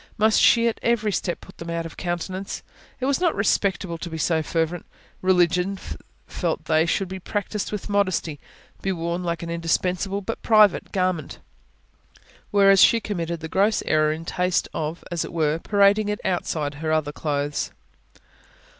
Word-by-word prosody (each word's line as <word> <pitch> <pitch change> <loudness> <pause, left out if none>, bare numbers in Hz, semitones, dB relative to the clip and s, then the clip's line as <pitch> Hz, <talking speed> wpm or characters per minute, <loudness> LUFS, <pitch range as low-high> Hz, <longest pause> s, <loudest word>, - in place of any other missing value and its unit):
Must 220 0 +4
she 235 0 +5
at 230 - -1
every 225 -3 +1
step 180 -2 -2
put 190 - -15
them 170 - -7
out 170 0 -2
of 165 - -8
countenance? 185 +2 -4 0.4
It 260 - -2
was 280 +4 +1
not 345 -3 +2
respectable 190 -4 0
to 170 - -5
be 160 - -5
so 160 0 +1
fervent. 165 +2 -2 0.3
Religion, 180 +1 +2 0.5
felt - - -3
they, 160 +1 +3
should 195 +3 0
be 190 +1 -6
practised 205 +2 -3
with 210 -2 -4
modesty; 185 -7 0 0.4
be 195 - -1
worn 170 0 -2
like 170 -1 -2
an 170 - -5
indispensable 180 +4 -1
but 225 +4 -5
private 215 -4 +4
garment. 185 -5 -1 1.1
Whereas 195 -2 +5
she 230 - +6
committed 170 -6 -4
the 160 - -5
gross 200 +6 +2
error 155 0 +3
in 160 +1 -5
taste 180 +1 0
of, 160 +2 -4
as 170 -2 -1
it - - -7
were, 155 -1 0
parading 205 +2 +3
it 210 - -2
outside 155 -5 -1
her 155 -1 -1
other 155 -2 +1
clothes. 145 -1 -2
180 Hz, 165 wpm, -24 LUFS, 165-200 Hz, 1.1 s, she